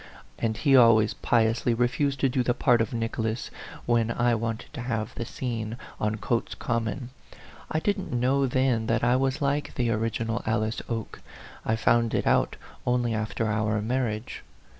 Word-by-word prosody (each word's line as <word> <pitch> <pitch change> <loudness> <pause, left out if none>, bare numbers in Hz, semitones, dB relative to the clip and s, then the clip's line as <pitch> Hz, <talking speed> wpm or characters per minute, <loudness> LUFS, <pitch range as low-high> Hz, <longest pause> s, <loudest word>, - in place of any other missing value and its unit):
and 110 -1 -1
he 135 +3 +4
always 115 -3 +6
piously 115 0 +1
refused 135 +3 0
to 135 - +3
do 130 0 0
the 120 0 +1
part 120 -2 +3
of 115 - -1
Nicholas, 115 0 -2 0.3
when 115 -1 +2
I 120 +1 +2
wanted 115 +2 -3
to 140 - -5
have 115 -3 -3
the 120 - -4
scene 115 -2 -4 0.2
on 105 0 0
Cotes 115 +2 -2
Common. 115 +1 -2 0.6
I 155 - 0
didn't 200 +2 -1
know 130 +3 +2
then 125 -3 +1
that 115 0 +1
I 120 +1 +4
was 135 +2 0
like 140 +1 -1
the 120 -2 +1
original 115 +1 -1
Alice 110 0 -1
Oke; 115 -2 -4 0.4
I 110 - +1
found 115 +1 +2
it - - 0
out - - +2 0.3
only 125 -1 +1
after 110 +1 -2
our 105 0 0
marriage. 115 0 -2
115 Hz, 165 wpm, -27 LUFS, 110-125 Hz, 0.6 s, always